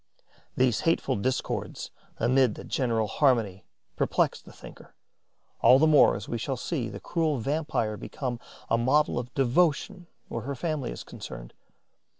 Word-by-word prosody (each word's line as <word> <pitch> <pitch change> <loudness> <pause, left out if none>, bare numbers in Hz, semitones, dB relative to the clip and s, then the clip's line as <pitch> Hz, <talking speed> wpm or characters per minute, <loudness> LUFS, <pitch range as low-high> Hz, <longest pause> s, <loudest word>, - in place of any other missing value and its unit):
These 125 -3 +3
hateful 165 - +1
discords 130 +6 -3 0.3
amid 125 -1 +3
the - - -9
general 115 -7 0
harmony 110 - +1 0.3
perplex - - 0
the - - -15
thinker, - - -14 0.7
all 130 - +7
the 150 - +4
more 155 -2 +6
as 105 - -6
we 120 - -3
shall 135 +3 -3
see 125 -3 -3
the - - -8
cruel 160 -4 -1
vampire 125 -5 -1
become 125 +3 -5 0.3
a 115 - +2
model 135 +2 +2
of 120 0 -7
devotion 170 - +1 0.2
where 115 - -4
her 140 +4 -4
family 150 -2 -2
is - - -7
concerned. - - -9
130 Hz, 150 wpm, -27 LUFS, 115-150 Hz, 0.7 s, all